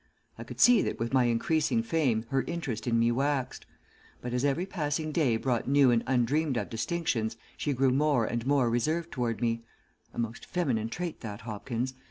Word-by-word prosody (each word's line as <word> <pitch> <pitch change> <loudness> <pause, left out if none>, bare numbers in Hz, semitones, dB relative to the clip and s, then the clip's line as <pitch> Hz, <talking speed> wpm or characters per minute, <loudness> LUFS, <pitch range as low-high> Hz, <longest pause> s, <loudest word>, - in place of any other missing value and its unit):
I - - -8
could - - -10
see 245 -1 +7
that - - -2
with 115 +2 -3
my 130 -2 +4
increasing 155 - +1
fame, 140 - +1
her 135 -1 +1
interest 135 -10 -4
in 115 -1 +2
me 115 +1 +3
waxed; 135 +1 -1 0.5
but 125 0 -5
as 125 +1 0
every 145 +6 +1
passing 155 -4 -2
day 140 -8 +2
brought 120 -1 -1
new 140 -2 +5
and 115 -1 +2
undreamed 130 +3 +1
of - - -3
distinctions 115 -3 -1 0.2
she 145 - -2
grew 130 0 +2
more 140 -3 +2
and 120 0 -2
more 140 -3 +3
reserved 155 +9 0
toward 115 -4 -2
me 115 -1 0 0.5
a - - -16
most 115 -1 -4
feminine 130 -12 -1
trait 175 +6 -4
that, 105 -3 -7
Hopkins. 115 +3 -4
130 Hz, 190 wpm, -29 LUFS, 115-150 Hz, 0.5 s, see